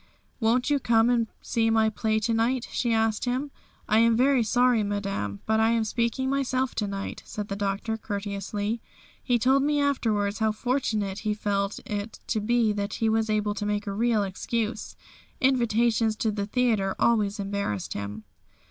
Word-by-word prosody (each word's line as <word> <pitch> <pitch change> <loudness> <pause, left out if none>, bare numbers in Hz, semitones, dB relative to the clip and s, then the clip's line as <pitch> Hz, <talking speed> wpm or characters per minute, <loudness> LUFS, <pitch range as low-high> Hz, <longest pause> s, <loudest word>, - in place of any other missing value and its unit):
"Won't 245 +4 +2
you 285 - +3
come 230 -1 +3
and 230 -2 +2 0.2
see 225 -1 +1
my 220 -1 +3
play 220 0 0
to 230 +2 0
night?" 235 +2 +1
she 240 - 0
asked 225 0 +1
him. 260 +4 -2 0.4
"I 215 - +4
am 230 0 +4
very 265 0 +4
sorry, 245 +1 +3
Madame, 200 - -3
but 220 0 +2
I 220 0 +4
am 230 -1 +2
speaking 235 +4 -1
myself 265 -1 0
to 210 - 0
night," 195 0 -5
said 210 -1 -6
the 200 - -2
Doctor 200 +2 -2
courteously. 205 +1 -3 0.4
He 245 -2 +2
told 265 +4 +3
me 295 +1 +1
afterwards 220 -8 0
how 220 -1 +2
fortunate 215 -5 -1
he 215 -1 -1
felt 200 -1 -1
it 205 +1 -5
to 220 - +1
be 230 0 +2
that 205 0 -3
he 225 - +1
was 220 0 +1
able 210 -1 +1
to 210 - -5
make 210 +1 -1
a 200 - -3
real 225 0 +2
excuse. 215 +3 -3 0.4
Invitations 235 -4 +2
to 220 0 0
the 200 -1 -3
theatre 220 -5 +1
always 215 -3 +2
embarrassed 195 - -3
him. 100 +2 -6
220 Hz, 175 wpm, -26 LUFS, 205-240 Hz, 0.4 s, I